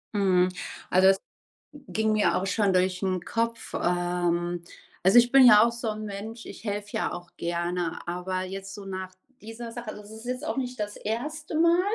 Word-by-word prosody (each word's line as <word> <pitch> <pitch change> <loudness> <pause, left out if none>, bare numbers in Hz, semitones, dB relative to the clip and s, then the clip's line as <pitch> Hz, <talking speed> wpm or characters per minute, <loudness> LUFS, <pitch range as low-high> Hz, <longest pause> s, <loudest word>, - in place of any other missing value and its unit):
Mhm, 185 -3 +4 0.4
also, 185 +1 +6
es 195 - +4 0.7
ging 220 0 +1
mir 215 -1 +3
auch 190 - 0
schon 200 -1 +2
durch 185 +1 +1
'n 185 -2 0
Kopf, 230 +2 -2
ähm, 175 -1 0 0.4
also, 190 +6 +6
ich 240 0 +3
bin 270 -1 +8
ja 215 -3 +9
auch 235 - +3
so 235 -1 -3
'n 215 0 -6
Mensch, 215 +3 -7
ich - - -10
helfe 205 -1 -3
ja - - -1
auch 175 -1 -8
gerne, 170 0 -2
aber 180 +2 -2
jetzt 195 +1 -6
so 200 -1 -9
nach 185 -1 -5 0.3
dieser 225 +2 -8
Sache, 235 -1 -7
also, 210 - -9
es 205 - -14
ist 220 +2 -10
jetzt 250 +3 -3
auch 315 - -2
nicht 250 -2 -3
das 210 0 -3
erste 300 +9 -4
Mal. 340 +1 +5
205 Hz, 195 wpm, -27 LUFS, 185-230 Hz, 0.7 s, ja